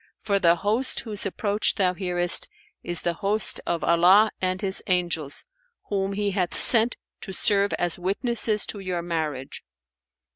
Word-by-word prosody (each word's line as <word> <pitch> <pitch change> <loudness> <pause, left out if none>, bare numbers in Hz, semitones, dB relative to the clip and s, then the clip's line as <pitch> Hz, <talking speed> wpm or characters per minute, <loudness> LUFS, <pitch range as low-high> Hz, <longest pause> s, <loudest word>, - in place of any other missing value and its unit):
for 200 -2 -1
the 170 -2 +4
host 215 +9 +1
whose 210 -3 -3
approach 205 +2 0
thou 185 -3 +1
hearest 175 -2 +2 0.3
is 175 -1 -1
the 175 - -1
host 205 +1 +1
of 170 -1 -2
Allah 180 +6 +4
and 185 0 -1
His 195 -1 0
Angels, 170 -6 -1 0.4
whom 195 -1 -2
He 205 0 -2
hath 185 -3 -2
sent 230 0 +4 0.3
to 195 - -8
serve 200 +1 +2
as 175 +1 -2
witnesses 210 +3 0
to 205 - -7
your 180 -3 -4
marriage. 155 -6 -5
190 Hz, 150 wpm, -24 LUFS, 175-205 Hz, 0.4 s, the